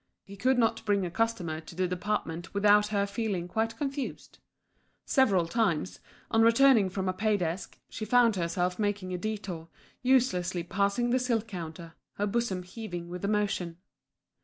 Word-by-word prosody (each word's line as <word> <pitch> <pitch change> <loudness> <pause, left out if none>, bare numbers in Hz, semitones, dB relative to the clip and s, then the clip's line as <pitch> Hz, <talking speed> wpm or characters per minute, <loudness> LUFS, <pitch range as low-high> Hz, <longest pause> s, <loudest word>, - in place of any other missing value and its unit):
He 200 - -11
could 255 +6 +2
not 225 -1 +2
bring 200 -3 +1
a 175 - -4
customer 185 -7 -1
to 160 +1 -12
the 185 +1 +1
department 180 -2 -3
without 210 +1 +5
her 200 -1 +1
feeling 200 -4 -2
quite 225 +4 -1
confused. 275 0 -5 0.7
Several 200 - +3
times, 185 -4 0 0.3
on 225 - +4
returning 230 -2 +5
from 190 0 -3
a 185 - +1
pay 210 +2 +1
desk, 175 0 -3
she 220 - -6
found 235 -1 +4
herself 180 +1 -1
making 205 -3 -1
a 180 - -3
détour 190 -5 -4 0.3
uselessly 185 -9 +2
passing 200 +7 0
the 255 - +3
silk 235 -3 0
counter, 170 -3 -7 0.2
her 205 - -1
bosom 205 -4 -1
heaving 180 -3 -7
with 180 +1 -7
emotion. 200 -5 -1
200 Hz, 160 wpm, -29 LUFS, 180-225 Hz, 0.7 s, without